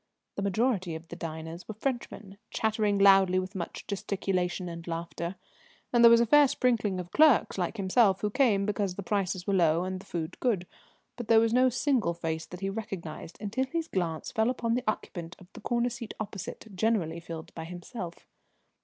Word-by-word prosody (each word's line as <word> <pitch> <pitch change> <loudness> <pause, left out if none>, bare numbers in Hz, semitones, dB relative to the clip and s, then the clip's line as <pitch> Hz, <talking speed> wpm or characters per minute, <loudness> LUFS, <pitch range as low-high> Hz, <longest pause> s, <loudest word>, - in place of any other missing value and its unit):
The - - -4
majority 200 -3 0
of 160 +1 -9
the - - -7
diners 165 0 -7
were 215 - -6
Frenchmen, 220 -5 -4
chattering 215 -2 +1
loudly 195 -2 +6
with 185 +1 -2
much 175 -4 -6
gesticulation 190 -2 -2
and 170 0 -7
laughter; 170 +1 -4 0.6
and 240 -1 +5
there 235 - +11
was 230 0 +7
a 235 - +4
fair 290 +5 +6
sprinkling 220 -7 +1
of 175 -1 -7
clerks 305 -5 +5
like 180 +5 -2
himself 195 0 +3
who 210 - 0
came 210 -6 +3
because 200 -3 -1
the 200 - -5
prices 185 -2 -1
were 200 - 0
low 170 -2 +3
and 185 0 -3
the 195 - -15
food 160 -2 -4
good, 210 -8 +1 0.5
but 240 -3 -6
there 225 0 +6
was 225 0 +2
no 255 +1 +5
single 250 - +1
face 160 -1 -3
that 180 +1 -9
he 195 - -1
recognised 190 -7 -6
until 220 +6 -1
his 330 +3 -2
glance 165 - -2
fell 220 +2 +2
upon 235 -2 -1
the 250 +1 0
occupant 175 -5 -3
of 185 - -15
the - - -11
corner 240 0 0
seat 235 -2 -7
opposite, 205 0 -7
generally 180 -6 0
filled 165 -1 -8
by 160 - -6
himself. 175 +1 -8
195 Hz, 190 wpm, -29 LUFS, 175-225 Hz, 0.6 s, there